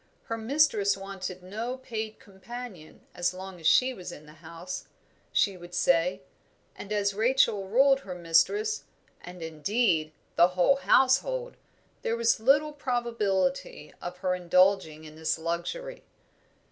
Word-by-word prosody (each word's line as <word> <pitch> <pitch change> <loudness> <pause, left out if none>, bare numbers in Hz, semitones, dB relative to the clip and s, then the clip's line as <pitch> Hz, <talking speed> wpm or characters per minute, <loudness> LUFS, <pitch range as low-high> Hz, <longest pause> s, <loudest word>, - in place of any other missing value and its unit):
Her 225 - -4
mistress 225 -5 +2
wanted 190 -2 -7
no 225 +7 -4
paid 220 -4 -5
companion 200 -3 -10
as 175 0 -1
long 190 -1 -8
as 160 - -1
she 260 0 +5
was 180 -6 -8
in 150 - -11
the 150 - -14
house, 170 +2 -7 0.5
she 200 -2 +2
would 175 0 -10
say; 180 +2 +2 0.5
and 205 - -9
as 200 -1 +1
Rachel 220 -3 +2
ruled 270 +6 +4
her 190 -8 -8
mistress 410 - +1 0.4
and, 180 -1 -9
indeed, 160 0 0 0.3
the 170 - +7
whole 230 +10 +4
household, 485 - +2 0.5
there 230 - -1
was 235 -1 +2
little 290 +6 +3
probability 245 - -1
of 175 +1 -6
her 185 - +2
indulging 180 -3 +2
in 155 -1 -11
this 160 0 -1
luxury. 175 - -4
200 Hz, 135 wpm, -28 LUFS, 180-250 Hz, 0.5 s, the